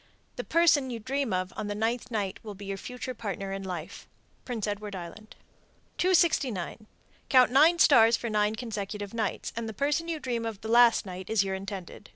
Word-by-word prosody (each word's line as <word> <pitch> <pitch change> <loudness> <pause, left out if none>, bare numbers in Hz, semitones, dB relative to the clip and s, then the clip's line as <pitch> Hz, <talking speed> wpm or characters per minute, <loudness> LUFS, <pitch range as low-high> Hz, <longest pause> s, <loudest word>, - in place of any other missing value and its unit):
The - - -4
person 315 -5 +3
you 240 - -4
dream 265 +2 -2
of 185 0 -2
on 215 - -4
the 205 - -3
ninth 230 +3 -1
night 205 -5 -2
will 210 -2 -8
be 200 +1 -10
your 195 0 -3
future 250 +4 -6
partner 195 -4 -5
in 195 - -4
life. 180 -4 -7 0.4
Prince 235 -5 -3
Edward 205 -1 -4
Island. 185 +5 -9 0.6
269. 275 - +1 0.4
Count 255 -3 +6
nine 310 +6 +6
stars 230 -8 +6
for 235 - -5
nine 210 -1 +1
consecutive 210 -3 -5
nights, 220 -4 -3
and 230 -1 -3
the - - -6
person 295 - 0
you 330 -2 -3
dream 240 -4 -2
of 225 -3 -5
the 220 - -6
last 235 -1 +5
night 185 -1 -8
is 220 -3 +3
your 195 -1 -3
intended. 190 -2 -7
220 Hz, 190 wpm, -28 LUFS, 195-250 Hz, 0.6 s, Count